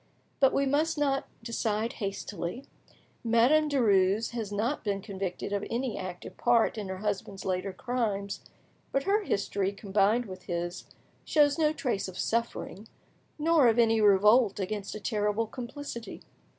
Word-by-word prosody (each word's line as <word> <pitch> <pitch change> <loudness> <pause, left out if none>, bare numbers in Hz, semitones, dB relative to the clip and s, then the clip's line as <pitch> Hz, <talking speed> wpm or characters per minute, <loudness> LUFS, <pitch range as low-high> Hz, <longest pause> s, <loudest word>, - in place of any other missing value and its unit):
But 270 -2 +5
we 275 - +1
must 305 +4 +1
not 275 -2 0 0.2
decide 225 -1 -1
hastily. 195 +3 -4 0.6
Madame 245 +7 +4
Denies 210 -6 +3
has 225 -4 -4
not 225 +8 -1
been 200 -2 -1
convicted 195 -1 -4
of 200 0 -1
any 240 0 -2
active 185 -1 -7
part 235 -2 +3
in 210 -3 -5
her 190 0 -4
husband's 200 -1 -3
later 185 +1 -1
crimes, 205 -2 -2 0.5
but 275 - +1
her 405 +2 +2
history, 200 - -1
combined 205 +3 +1
with 185 -2 -10
his, 175 +1 -4 0.4
shows 295 0 +3
no 305 -1 +4
trace 250 -11 -2
of 185 - -9
suffering, 230 -2 -2 0.5
nor 315 -3 +4
of 230 0 +3
any 225 -2 +4
revolt 210 +2 +5
against 200 +1 -3
a - - -5
terrible 210 +1 0
complicity. 245 0 -7
220 Hz, 145 wpm, -29 LUFS, 195-250 Hz, 0.6 s, But